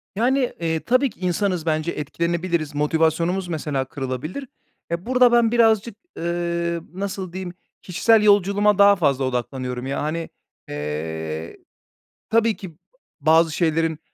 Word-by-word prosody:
Yani, 250 +4 +1
eee, 160 -1 -1
tabii 255 - +2
ki - - -20
insanız 180 -1 -1
bence 155 +1 0
etkilenebiliriz, 170 0 -2
motivasyonumuz 165 +5 +1
mesela 150 -5 -2
kırılabilir. 140 - -5 0.4
Ya 170 +3 -3
burada, 250 -1 +4
ben 235 -1 +4
birazcık, 225 -2 +3 0.2
eee, 170 0 -1
nasıl 190 -2 -5
diyeyim? 185 -1 -5 0.3
Kişisel 215 +4 +3
yolculuğuma 205 0 +4
daha 200 0 +7
fazla 140 -7 +1
odaklanıyorum 125 0 -3
ya 135 - -2
hani, 160 +2 -3 0.4
eee, 80 +2 -5 0.7
tabii 230 -1 +3
ki 180 -5 -10 0.5
bazı 160 +2 +4
şeylerin, 160 -1 0
170 Hz, 125 wpm, -22 LUFS, 150-200 Hz, 0.7 s, daha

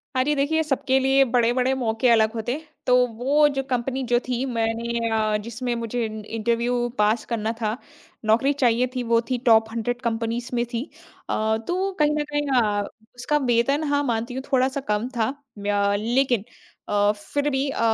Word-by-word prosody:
हाँ 255 - +3
जी, 295 +3 +1
देखिए 295 +3 +1
सबके 270 -3 +1
लिए 270 +1 +4
बड़े-बड़े 250 +1 +2
मौके 235 -1 0
अलग 220 -1 +4
होते 225 +1 -3
हैं। 315 +2 -7 0.2
तो 250 - +5 0.2
वो 285 +5 +3
जो 270 - -1
कंपनी 260 +1 -1
जो 240 0 +2
थी 250 +1 -1
मैंने 230 -1 -1
अ, 215 -1 +1
जिसमें 235 +3 -4
मुझे 235 +1 -2
इन 215 -1 -6
इंटरव्यू 235 +2 0
पास 210 +2 +2
करना 225 -2 -2
था, 215 +2 -1 0.5
नौकरी 235 +6 +3
चाहिए 250 -2 +2
थी, 250 - -1
वो 230 0 +3
थी 255 - +1
टॉप 220 -2 +5
100 240 +2 -3
कंपनीज़ 230 0 -2
में 240 0 +1
थी। 235 +1 -1 0.5
अ, 220 0 +1
तो 375 +2 0
कहीं 300 0 +4
न 300 - +1
कहीं 290 0 -1
अ, 205 -2 0 0.3
उसका 295 +5 0
वेतन 275 +6 +2
हाँ, 285 - +2
मानती 235 -1 -2
हूँ 260 +1 -4
थोड़ा-सा 265 +1 +2
कम 210 +3 0
था। 220 -1 +1 0.3
व्य 200 0 +1
लेकिन 240 0 +1 0.5
अ, 205 0 +3
फिर 285 +8 -2
भी 270 0 0
अ, - - -4
240 Hz, 185 wpm, -24 LUFS, 225-265 Hz, 0.5 s, तो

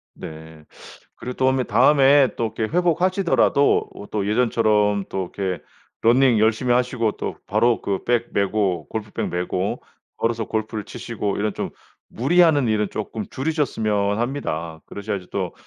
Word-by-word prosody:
네. 80 -1 -10 0.5
그리고 125 - -6
도음에 130 0 +2
다음에 135 +4 +5
또 115 - -1
이렇게 110 - 0
회복하시더라도 180 -4 +2
어 100 - -9
또 105 -2 -1
예전처럼 105 -3 +2
또 95 -2 -4
이렇게 95 -2 -2 0.4
러닝 120 0 +4
열심히 110 +3 +2
하시고 120 -3 +1
또 - - -5
바로 115 +3 +2
그 100 -2 -2
백 120 -1 0
메고 100 -4 0
골프백 110 -2 -4
메고 90 +2 -2 0.4
걸어서 115 -1 -1
골프를 110 -1 -3
치시고 105 -4 -4
이런 105 -1 -1
좀 - - -4 0.4
무리하는 145 0 +3
일은 105 -2 +1
쪼끔 110 0 -5
줄이셨으면 110 -9 0
합니다. 85 - -3
그러셔야지 100 -3 -5
또 95 -3 -3
110 Hz, 325 characters per minute, -22 LUFS, 100-130 Hz, 0.5 s, 다음에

